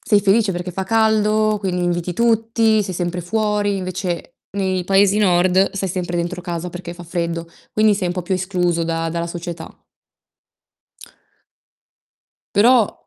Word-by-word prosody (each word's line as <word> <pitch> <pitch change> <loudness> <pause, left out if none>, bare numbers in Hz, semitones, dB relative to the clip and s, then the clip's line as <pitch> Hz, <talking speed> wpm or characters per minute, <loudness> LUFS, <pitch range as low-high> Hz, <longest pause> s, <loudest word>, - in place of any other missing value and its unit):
sei 205 -3 +5
felice 205 +1 +3
perché 175 +1 -4
fa 190 +2 -3
caldo, 215 0 +2
quindi 180 -3 -2
inviti 175 0 -1
tutti, 225 -1 +2
sei 190 -1 -5
sempre 175 0 -2
fuori, 205 +1 0
invece 185 -2 -4 0.2
nei 190 -2 -1
paesi 195 +2 +3
nord 185 -1 +3
stai 195 -1 -2
sempre 175 -1 -3
dentro 175 +1 -2
casa 175 0 -4
perché 175 0 -7
fa 175 - -10
freddo, 170 -1 -3 0.2
quindi 215 -1 +3
sei 190 -2 -2
un 175 - -2
po' 180 - -3
più 180 +3 -4
escluso 180 -2 0
da 165 0 -2
dalla 170 0 -2
società. 170 -1 -7 2.8
Però 230 0 +3
185 Hz, 145 wpm, -20 LUFS, 175-210 Hz, 2.8 s, sei